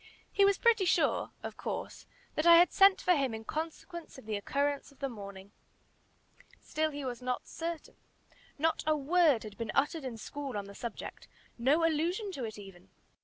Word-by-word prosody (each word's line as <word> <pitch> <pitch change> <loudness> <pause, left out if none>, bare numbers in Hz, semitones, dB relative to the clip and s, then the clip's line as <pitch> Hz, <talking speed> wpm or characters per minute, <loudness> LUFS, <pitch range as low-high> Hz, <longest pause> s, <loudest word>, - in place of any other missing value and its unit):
He 400 - +3
was 400 0 +4
pretty 455 -5 +4
sure, - - +2
of - - -6
course, - - -5 0.3
that 305 +2 +1
I 340 - +10
had 345 +1 +6
sent 390 0 +6
for 365 - +2
him 270 -6 0
in 220 - -7
consequence 325 +2 -6
of 265 - -12
the 215 -1 -2
occurrence 280 +8 -1
of 280 - -21
the 275 - -2
morning. 200 -3 -9 1.1
Still 310 0 -1
he 290 -2 -6
was 250 -1 -4
not 250 0 -3
certain. 335 -1 -6 0.6
Not 320 +2 +1
a 310 -1 +3
word 300 -3 +3
had 210 -1 -10
been 230 -2 -2
uttered 295 +3 +1
in 250 -3 -5
school 275 +1 -5
on 200 - -4
the 200 - -10
subject 235 +2 -7 0.3
no 290 +7 +3
allusion 345 +6 0
to 275 -9 -5
it 215 -1 -7
even. 195 -3 -12
285 Hz, 185 wpm, -31 LUFS, 230-335 Hz, 1.1 s, I